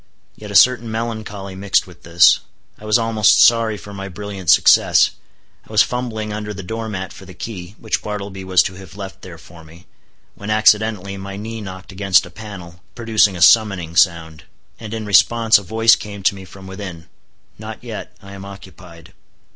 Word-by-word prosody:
Yet 105 - -11
a 100 - -7
certain 120 +3 +4
melancholy 110 -4 -5
mixed 95 +1 0
with 90 -2 -17
this: 85 +1 +4 0.4
I 110 - -12
was 105 +1 +3
almost 115 -3 +3
sorry 115 -2 +4
for 100 0 -11
my 100 0 -7
brilliant 100 -2 -7
success. - - +5 0.6
I - - -13
was 105 -1 +5
fumbling 110 -4 -4
under 105 0 -6
the 100 - -8
door 115 +3 -5
mat 95 -3 -6
for 95 - -13
the 95 -1 -13
key, 90 0 -8
which 110 - -3
Bartleby 100 -2 -6
was 95 -3 +3
to 95 - -5
have 95 -2 -13
left 95 -8 -9
there - - -11
for 85 -1 -16
me, 85 +3 -17 0.5
when 100 - -9
accidentally 105 -2 +2
my 100 0 -8
knee 110 +2 -7
knocked 95 -1 -9
against 95 -1 +2
a 90 - -13
panel, 90 -4 -11
producing 110 -4 +2
a 85 - +1
summoning 95 -7 +3
sound, 85 -3 +1 0.3
and 110 -2 -9
in 110 -1 -5
response 115 +2 +4
a - - -10
voice 115 +4 +4
came 100 -2 -9
to 95 - +3
me 95 -1 -11
from 95 +1 -14
within—"Not 95 -4 -11
yet; - - -8
I 100 0 -12
am 100 -1 -10
occupied." 95 -4 -13
100 Hz, 185 wpm, -19 LUFS, 95-110 Hz, 0.6 s, success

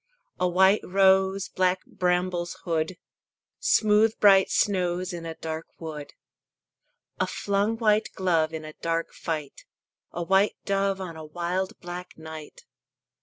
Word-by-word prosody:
A 180 - +2
white 190 +3 +4
rose 190 0 +3
Black 185 0 0
brambles 180 -1 -1
hood; 165 +1 -1 0.6
Smooth 215 +1 +3
bright 195 -2 +6
snows 185 -2 0
In 170 -1 -6
a 165 - -6
dark 160 0 -5
wood. 150 -3 -8 1.0
A - - +1
flung 205 +3 0
white 215 -1 +2
glove 165 -4 +1
In 160 -1 -6
a 155 - -9
dark 165 +1 -2
fight; 155 -4 -5 0.5
A 175 - -4
white 195 +3 +3
dove 195 -1 0
On 180 -3 -6
a 160 - -8
wild 175 +4 -3
black 175 +1 -8
night. 160 -1 -10
180 Hz, 130 wpm, -26 LUFS, 165-195 Hz, 1.0 s, bright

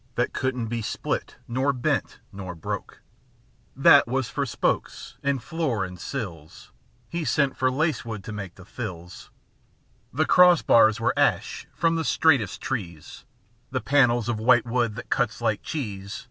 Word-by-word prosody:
That - - 0
couldn't 125 -2 -1
be 115 +1 -3
split 110 - -3
nor 130 +4 +1
bent 125 - -2
nor 95 -3 -7
broke 80 - -6 0.7
â - - -10
That 140 - +8
was 130 0 -1
for 140 +1 -2
spokes 100 - -2
and 140 -4 -1
floor 140 -12 -1
and 90 -1 -10
sills; 85 - -7 0.4
He 170 -1 -3
sent 140 0 +1
for 130 - +1
lancewood 130 - -2
to - - -7
make 100 -4 -7
the 95 - -14
thills; 90 -6 -8 0.8
The 155 +5 +1
cross 180 -2 +6
bars 110 -1 +5
were 115 - +1
ash, - - 0
from 165 0 +1
the 165 - -1
straightest 140 - +2
trees; 85 - -6 0.4
The 130 0 -1
panels 125 -5 +3
of 120 -2 -1
white 120 +2 +4
wood, 120 -2 0
that - - -9
cuts 125 -2 0
like 110 -3 0
cheese. 100 -9 -5
120 Hz, 160 wpm, -25 LUFS, 105-135 Hz, 0.8 s, That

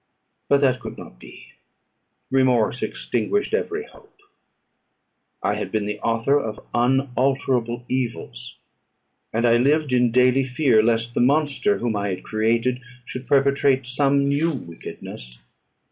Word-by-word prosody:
But 140 0 +4
that 130 -2 +2
could 110 -3 -8
not - - -12
be. - - -14 0.8
Remorse 130 -3 +2
extinguished 410 +2 -2
every 435 -1 -1
hope. 430 -3 -20 1.3
I - - +1
had - - -4
been 110 -2 -1
the 105 0 -4
author 115 +6 +1
of 110 -5 -5
unalterable 125 -1 0
evils; 120 - -4 0.7
and 115 +2 0
I 120 0 +5
lived 145 +2 +2
in 125 -1 +3
daily 125 +2 +4
fear, 130 -3 +3
lest 115 +1 0
the - - +1
monster 145 +9 +2
whom 120 -3 -2
I 100 0 -1
had 95 -1 -4
created 115 +3 0 0.2
should 130 0 -8
perpetrate 140 -1 +2
some 140 +2 +1
new 145 +4 +1
wickedness. 80 - -9
125 Hz, 130 wpm, -22 LUFS, 115-140 Hz, 1.3 s, I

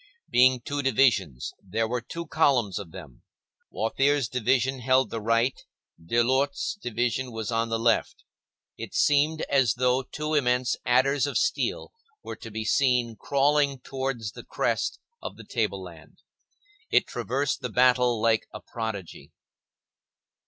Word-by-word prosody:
Being 125 0 +5
two 145 +4 -3
divisions, 115 - +1
there 110 +4 -2
were 125 +1 -2
two 170 +8 -7
columns 125 - +1
of 95 -5 -9
them; 75 -9 -12 0.5
Wathier's 135 +4 +1
division 130 +2 0
held 130 +2 +2
the 115 - -4
right, 115 +4 +1 0.4
Delort's 130 +8 +1
division 120 - -2
was 110 0 -4
on 115 0 0
the 115 - 0
left. 115 0 0 0.5
It - - -8
seemed 150 +2 +3
as 135 -5 +2
though 125 +1 +2
two 150 +4 -5
immense 125 -3 +2
adders 130 +2 +3
of - - -1
steel 485 - -1 0.3
were - - -6
to 115 - -9
be 110 0 -5
seen 125 -2 +2
crawling 140 +3 +1
towards 130 -5 -4
the - - -11
crest - - -1 0.2
of - - -7
the - - -12
table - - -2
land. - - -14 0.7
It - - +4
traversed 140 +3 -2
the 125 - -3
battle 125 0 +3
like 110 0 +2
a - - -8
prodigy. 110 -6 -6
125 Hz, 140 wpm, -26 LUFS, 115-135 Hz, 0.7 s, Being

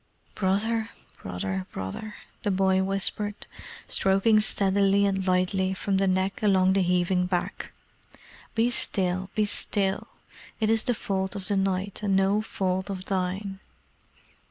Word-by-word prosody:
"Brother 220 +4 0 0.3
Brother 95 +1 -3
Brother!" 95 - -6 0.3
the - - -1
boy 190 -1 +3
whispered, 195 +2 -2 0.4
stroking 195 +3 +3
steadily 200 -1 +2
and 195 -1 0
lightly 185 +1 +1
from 195 +1 0
the 195 0 +2
neck 190 +1 0
along 190 -3 +4
the 195 - +3
heaving 180 0 +2
back. 180 -1 -3 0.8
"Be 230 +2 +3
still, 185 -4 0
be 215 0 +3
still! 195 -1 -1 0.5
It 220 -1 +2
is 225 -1 +2
the 245 -3 +1
fault 190 -1 -2
of 195 0 -4
the 205 - +2
night, 195 +1 -1
and 200 -2 +1
no 195 +2 +3
fault 190 -2 -2
of 190 -1 -5
thine." 195 +1 -2
195 Hz, 135 wpm, -27 LUFS, 185-205 Hz, 0.8 s, along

